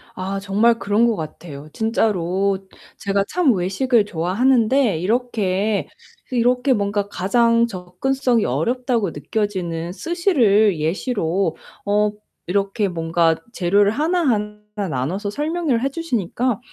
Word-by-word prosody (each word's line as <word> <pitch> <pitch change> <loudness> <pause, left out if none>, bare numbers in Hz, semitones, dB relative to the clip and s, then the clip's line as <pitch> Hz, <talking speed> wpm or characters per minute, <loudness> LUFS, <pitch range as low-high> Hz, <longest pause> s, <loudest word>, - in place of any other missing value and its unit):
아 195 +1 -3
정말 210 +4 +2
그런 210 +3 +2
것 230 - +1
같아요. 155 -2 -8
진짜로 200 -4 0 0.4
제가 200 0 0
참 340 -8 +3
외식을 210 +5 +1
좋아하는데 220 +5 +2
이렇게, 210 -1 0 0.4
이렇게 250 +2 +2
뭔가 200 -2 -1
가장 230 +5 +2
접근성이 230 +5 -1
어렵다고 230 - 0
느껴지는 170 0 -3
스시를 225 - +2
예시로 170 - -1 0.3
어 210 +1 +2 0.4
이렇게 200 +3 0
뭔가 165 -1 +1 0.2
재료를 200 +2 +3
하나하나 260 - 0 0.3
나눠서 160 - -2
설명을 300 0 -1
해 270 - +1
주시니까 250 - -2
205 Hz, 270 characters per minute, -21 LUFS, 185-245 Hz, 0.4 s, 참